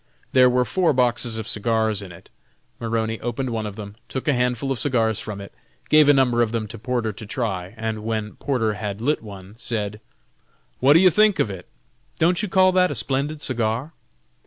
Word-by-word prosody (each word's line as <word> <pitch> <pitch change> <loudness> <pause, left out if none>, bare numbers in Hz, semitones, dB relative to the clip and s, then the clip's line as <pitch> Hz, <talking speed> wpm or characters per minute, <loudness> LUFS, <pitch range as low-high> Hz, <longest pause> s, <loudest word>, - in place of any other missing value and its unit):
There 125 -1 +6
were 125 0 +2
four 170 - +1
boxes 120 -2 +1
of 110 -1 -5
cigars 110 -1 0
in 95 -3 -9
it. 85 - -15 0.5
Maroney 115 -1 -2
opened 120 +2 -3
one 110 -2 -2
of 100 - -7
them, 105 -1 -8
took 130 - -5
a 150 - +4
handful 125 +1 0
of 130 - -1
cigars 115 -6 +2
from 105 -2 -6
it, 100 - -10 0.4
gave 155 -1 +6
a - - +8
number 125 -3 +3
of 115 -2 +1
them 115 -2 -2
to 115 - -8
Porter 115 -2 -2
to 110 - -10
try, 100 -5 -3
and 110 -1 -3
when 110 -1 -3
Porter 115 -6 0
had 105 -1 -5
lit 145 +7 0
one, 100 -2 -11
said: 105 -3 -3 0.8
"What 135 +3 +6
do 165 - +7
you 185 0 +6
think 210 +2 +4
of - - +1
that? 95 -3 -8 0.5
don't 175 +3 +2
you 210 - -3
call 185 0 +4
that 180 0 +3
a - - -4
splendid 140 +6 -2
cigar?" 120 +4 -1
115 Hz, 205 wpm, -23 LUFS, 110-135 Hz, 0.8 s, a